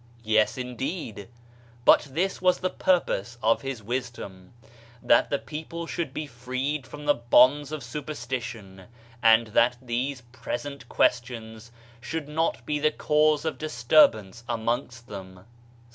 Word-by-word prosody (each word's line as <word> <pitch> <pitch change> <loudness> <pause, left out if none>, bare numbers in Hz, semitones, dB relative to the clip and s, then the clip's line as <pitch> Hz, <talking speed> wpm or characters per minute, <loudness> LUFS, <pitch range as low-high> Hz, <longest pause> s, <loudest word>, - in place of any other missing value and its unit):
Yes 110 +1 +2
indeed, 125 - -5 0.6
but - - +6
this 180 +8 -1
was 180 -1 +4
the 185 - -2
purpose 120 - 0
of 115 +1 +3
his 135 -5 -5
wisdom: 115 -6 -5 0.5
That 120 - +4
the 140 - +1
people 160 +4 -7
should 165 -4 -3
be 155 +2 -4
freed 130 +2 -4
from 150 0 -9
the 145 - +5
bonds 130 +4 +4
of 155 -3 -5
superstition, 120 -7 -6 0.4
and 115 0 +5
that 120 +3 +3
these 125 +2 -3
present 130 +1 -6
questions 115 -2 -1 0.3
should 145 +5 -5
not 160 +2 -1
be 150 -1 -1
the 155 +1 +3
cause 150 0 +2
of 160 - -2
disturbance 120 -7 +3
amongst 120 +1 -2
them. 95 -2 -10
125 Hz, 130 wpm, -26 LUFS, 115-150 Hz, 0.6 s, but